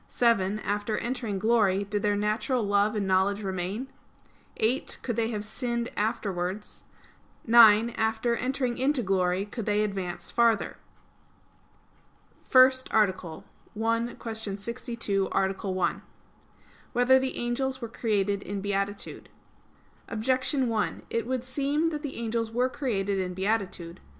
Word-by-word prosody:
(7) 210 -4 +2
After 205 +2 -1
entering 235 -4 -2
glory, 205 -2 +3
did 205 +1 -2
their 205 0 +2
natural 215 +4 0
love 205 +1 +2
and 205 -2 0
knowledge 195 +2 +2
remain? 190 +5 -3 0.7
(8) 230 +5 0
Could 235 - -2
they 225 0 +1
have 210 -2 -4
sinned 235 +1 -3
afterwards? 205 -3 -3 0.6
(9) 230 -1 +7
After 225 +1 0
entering 255 0 -1
into 265 -1 +1
glory, 190 -1 +1
could 215 +1 -6
they 210 0 +2
advance 190 -4 -4
farther? 235 -1 +2 1.7
_______________________ - - -31
FIRST 260 0 +5
ARTICLE 185 -6 0 0.3
[I, 230 +1 0
Q. 225 - -5 0.2
62, 225 -3 -2
Art. 190 +1 0
1] 185 -2 -1 0.9
Whether 250 +2 +5
the 260 0 -2
Angels 260 +2 -1
Were 235 - -5
Created 205 -3 0
in 200 0 -4
Beatitude? 200 0 -3 0.8
Objection 255 +4 0
1: 220 -3 -1
It 230 0 -1
would 255 -1 -1
seem 280 +5 0
that 300 -2 -4
the 290 -3 -5
angels 230 -1 -2
were 245 +3 +1
created 200 -8 -1
in 180 -1 -3
beatitude. 190 -3 -2
220 Hz, 130 wpm, -27 LUFS, 200-240 Hz, 1.7 s, 9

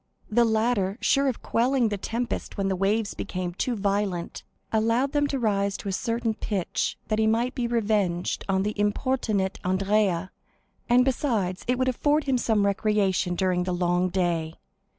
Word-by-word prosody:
The 235 +2 +4
latter, 220 -3 +1
sure 275 0 +2
of 255 - -2
quelling 245 0 +2
the 205 - -1
tempest 235 +4 -4
when 195 -1 0
the 190 - 0
waves 200 +3 0
became 180 -1 -4
too 240 +6 -1
violent, 200 -3 -1 0.3
allowed 230 +5 +2
them 290 -1 +2
to 280 - -2
rise 200 -4 0
to 200 - -5
a - - -1
certain 230 +3 -1
pitch 200 -4 -2
that 215 0 +1
he 220 - +3
might 235 +4 +1
be 245 -2 -1
revenged 205 -7 0
on 190 0 +2
the 210 +1 -1
importunate 205 -2 0
Andrea, 190 -1 +1 0.6
and 250 +1 +5
besides 225 -9 0
it 250 +1 +1
would 255 0 +1
afford 290 +4 +2
him 265 -3 +1
some 220 -4 +2
recreation 200 -3 +1
during 180 -1 +1
the 180 0 -2
long 175 +1 +1
day. 170 -3 -1
210 Hz, 170 wpm, -26 LUFS, 190-240 Hz, 0.6 s, and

